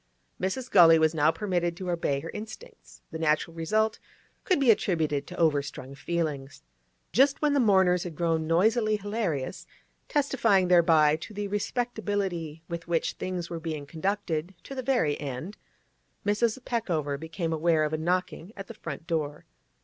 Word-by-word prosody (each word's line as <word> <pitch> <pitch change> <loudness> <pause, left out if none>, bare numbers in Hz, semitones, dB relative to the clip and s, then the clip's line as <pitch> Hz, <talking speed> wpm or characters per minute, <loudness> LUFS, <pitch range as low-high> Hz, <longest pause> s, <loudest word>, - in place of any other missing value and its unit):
Mrs. 235 +8 -2
Gully 165 -3 +8
was 160 0 +3
now 155 -1 +3
permitted 175 0 -1
to 180 -1 -3
obey 145 -5 -1
her 165 - -7
instincts; 330 - -10
the 160 - -5
natural 160 +1 +1
result 215 +7 0 0.5
could 370 -6 +2
be 265 -4 +6
attributed 160 -9 0
to 180 - -9
overstrung 145 -4 0
feelings. 145 - -3 0.5
Just 270 - +4
when 300 -1 +2
the 285 - +3
mourners 190 -6 +4
had 175 -3 -7
grown 165 -1 0
noisily 215 +6 +3
hilarious, 205 - -3 0.4
testifying 230 -10 +2
thereby 160 -4 +5
to 205 +6 -10
the 205 0 -3
respectability 205 -7 -2
with 170 -1 -6
which 170 -1 0
things 180 -2 -5
were 170 - -3
being 155 -3 -5
conducted 180 +1 -2
to - - -8
the 260 - -3
very 245 - +1
end, 145 +8 -5 0.7
Mrs. 215 +3 +1
Peckover 165 - -1
became 165 +1 -3
aware 160 0 +2
of 150 0 -1
a - - +1
knocking 180 +3 -2
at 195 - -6
the - - -9
front 155 0 -7
door. 150 -3 -3
175 Hz, 155 wpm, -27 LUFS, 160-205 Hz, 0.7 s, Gully